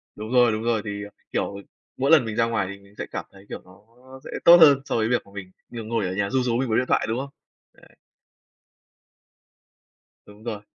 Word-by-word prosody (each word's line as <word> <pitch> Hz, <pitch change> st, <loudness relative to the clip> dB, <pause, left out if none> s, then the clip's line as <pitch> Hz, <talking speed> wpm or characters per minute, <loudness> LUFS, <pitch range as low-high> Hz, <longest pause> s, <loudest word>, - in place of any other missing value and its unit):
Đúng 110 Hz, +2 st, -7 dB
rồi, 125 Hz, -2 st, +4 dB
đúng 110 Hz, +1 st, -3 dB
rồi, 115 Hz, -2 st, 0 dB
thì, 100 Hz, 0 st, -5 dB
ờ, 105 Hz, -, -9 dB, 0.2 s
kiểu, 100 Hz, -, -2 dB, 0.4 s
mỗi 135 Hz, +4 st, +1 dB
lần 155 Hz, -7 st, +6 dB
mình 110 Hz, -1 st, -5 dB
ra 115 Hz, -, +2 dB
ngoài 115 Hz, -5 st, -1 dB
thì 100 Hz, -, -10 dB
mình 100 Hz, +1 st, -21 dB
sẽ -, -, -4 dB
cảm -, -, -5 dB
thấy, 100 Hz, 0 st, -17 dB
kiểu, -, -, -7 dB
nó 90 Hz, +2 st, -19 dB, 0.4 s
sẽ -, -, -8 dB
tốt 170 Hz, +1 st, +10 dB
hơn 140 Hz, -3 st, +7 dB
so -, -, -3 dB
với 110 Hz, 0 st, 0 dB
việc 125 Hz, -, 0 dB
mà 100 Hz, -, -19 dB
mình 95 Hz, -2 st, -8 dB, 0.2 s
nh 115 Hz, -2 st, -8 dB
ngồi 115 Hz, -3 st, -1 dB
ở 90 Hz, -, -4 dB
nhà 100 Hz, 0 st, -1 dB
ru 130 Hz, +3 st, 0 dB
rú 120 Hz, -2 st, 0 dB
mình 130 Hz, 0 st, -1 dB
với 110 Hz, -, +1 dB
điện 125 Hz, -, 0 dB
thoại, -, -, +1 dB
đúng 115 Hz, -, -1 dB
không? 140 Hz, +1 st, -5 dB, 0.4 s
Đấy. -, -, -22 dB, 2.3 s
Đúng 105 Hz, +1 st, -16 dB
rồi. 110 Hz, -3 st, -5 dB
110 Hz, 235 wpm, -24 LUFS, 100-125 Hz, 2.3 s, tốt